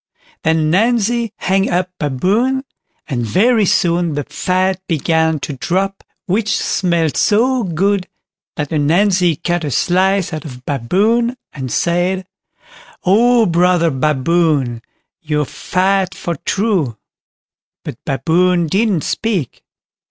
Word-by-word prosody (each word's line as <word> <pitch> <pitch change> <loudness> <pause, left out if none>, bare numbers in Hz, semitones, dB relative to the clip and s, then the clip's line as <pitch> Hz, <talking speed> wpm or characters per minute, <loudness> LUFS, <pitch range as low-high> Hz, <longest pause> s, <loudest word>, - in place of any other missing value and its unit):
Then 160 -1 +1
Ananzi 230 +2 +1
hung 195 +1 +1
up 180 +1 -1
Baboon, 205 - 0 0.4
and 125 -5 -2
very 210 - +2
soon 170 -3 +1
the 145 - -2
fat 185 +4 -1
began 160 -1 +1
to 145 - -4
drop, 190 +8 -2 0.2
which 205 +2 0
smelt 170 -5 0
so 245 +5 +2
good 190 +1 0 0.5
that 150 -3 -4
Ananzi 175 +3 +2
cut 175 +2 -2
a 150 - -2
slice 185 +6 +1
out 155 -2 -4
of 125 -4 -10
Baboon, 210 - +1 0.2
and 130 -3 -6
said, 180 +2 0 0.8
"Oh! 230 +5 +4
brother 175 -1 +2
Baboon, 145 -2 +1 0.4
you're 150 -3 -1
fat 190 +5 0
for 170 - -4
true." 190 - 0 0.9
But - - -8
Baboon 175 +5 +1
didn't 195 0 +1
speak. 175 - -2
180 Hz, 115 wpm, -17 LUFS, 155-195 Hz, 0.9 s, Oh